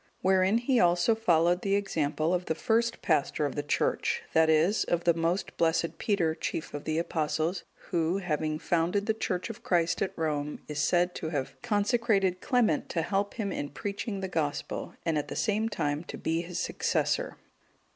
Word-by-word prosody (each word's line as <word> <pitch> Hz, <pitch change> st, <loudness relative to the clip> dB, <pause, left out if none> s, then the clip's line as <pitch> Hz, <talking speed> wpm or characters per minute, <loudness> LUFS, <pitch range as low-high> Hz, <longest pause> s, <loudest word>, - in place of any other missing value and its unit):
Wherein 190 Hz, +2 st, +4 dB
he 245 Hz, +1 st, +2 dB
also 175 Hz, +5 st, +4 dB
followed 175 Hz, -5 st, +2 dB
the 195 Hz, 0 st, +1 dB
example 155 Hz, -5 st, 0 dB
of 180 Hz, 0 st, 0 dB
the 160 Hz, -, -1 dB
first 235 Hz, +4 st, 0 dB
pastor -, -, +1 dB
of -, -, -2 dB
the -, -, -2 dB
Church, 470 Hz, 0 st, 0 dB
that 160 Hz, 0 st, +4 dB
is, 160 Hz, +7 st, +3 dB
of 175 Hz, 0 st, -1 dB
the 170 Hz, -, +4 dB
most 170 Hz, +3 st, -1 dB
blessed 165 Hz, 0 st, +1 dB
Peter, 175 Hz, -7 st, +1 dB
chief 160 Hz, -, -4 dB
of 145 Hz, -, -6 dB
the 155 Hz, 0 st, -1 dB
Apostles, 160 Hz, +1 st, -1 dB, 0.3 s
who, 170 Hz, +2 st, +1 dB
having 155 Hz, -4 st, -1 dB
founded 175 Hz, +5 st, 0 dB
the 220 Hz, -, +2 dB
Church 185 Hz, -1 st, -2 dB
of 215 Hz, -, -12 dB
Christ 175 Hz, -1 st, +1 dB
at 195 Hz, -, 0 dB
Rome, 150 Hz, -2 st, -2 dB
is 150 Hz, -1 st, -4 dB
said 175 Hz, +4 st, +2 dB
to 160 Hz, -, -4 dB
have 145 Hz, -5 st, -3 dB
consecrated 205 Hz, -4 st, +1 dB
Clement 235 Hz, -, +1 dB
to 165 Hz, -, -1 dB
help 200 Hz, +2 st, -1 dB
him 205 Hz, -4 st, -2 dB
in 145 Hz, -, -3 dB
preaching 200 Hz, +4 st, -4 dB
the 190 Hz, -, -2 dB
Gospel, 155 Hz, -5 st, -3 dB
and 160 Hz, -3 st, +1 dB
at 145 Hz, -, -4 dB
the -, -, -6 dB
same 220 Hz, +1 st, 0 dB
time 145 Hz, -7 st, -1 dB
to -, -, -7 dB
be 165 Hz, +1 st, -1 dB
his 175 Hz, 0 st, -6 dB
successor. -, -, 0 dB
175 Hz, 185 wpm, -29 LUFS, 160-205 Hz, 0.3 s, Wherein